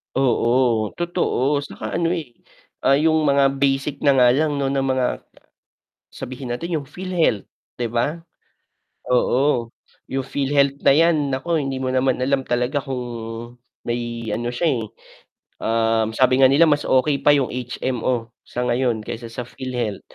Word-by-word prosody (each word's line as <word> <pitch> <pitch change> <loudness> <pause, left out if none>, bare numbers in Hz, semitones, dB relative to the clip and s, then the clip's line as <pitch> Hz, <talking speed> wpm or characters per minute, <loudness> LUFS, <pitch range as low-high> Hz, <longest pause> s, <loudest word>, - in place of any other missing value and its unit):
Oo, 120 -3 +2
totoo 150 -5 0
'tsaka 145 - -7
ano, 170 - +1
eh, 155 -8 -6 0.6
ah, 135 - +6
'yung 155 0 +2
mga 140 -1 +4
basic 140 +1 0
na 140 -1 +3
nga 125 -2 +6
lang 150 +3 +1
na 135 -1 0
mga 130 -1 0 0.9
sabihin 130 0 -7
natin 165 +7 -3
'yung 145 - -2
PhilHealth, 170 - -1 0.3
'di 120 - 0
ba? 120 +8 -1 1.0
Oo, 125 -2 +2 0.4
'yung 135 0 -2
PhilHealth 140 0 +1
na - - +5
'yan 150 -1 +3
nako 150 +6 -1
hindi 135 -4 -1
mo 130 - -3
naman 130 0 +2
alam 135 +1 +1
talaga 125 +3 -1
kung 130 -2 -4 0.8
may 120 -1 -3
ano 120 +2 -2
siya. 125 +8 -1 0.2
eh. - - -4 0.8
Um, 115 -1 +1
sabi 130 0 +3
nga 130 - +8
nila 145 +5 +5
mas 145 -2 +1
okey 140 +2 +2
pa - - +1
'yung 135 -3 0
HMO 125 -1 -2 0.2
sa 125 0 -3
ngayon 120 -3 0
kaysa 115 +1 -6
sa 120 +1 -6
PhilHealth, 120 -5 -4
130 Hz, 150 wpm, -21 LUFS, 120-140 Hz, 1.0 s, nga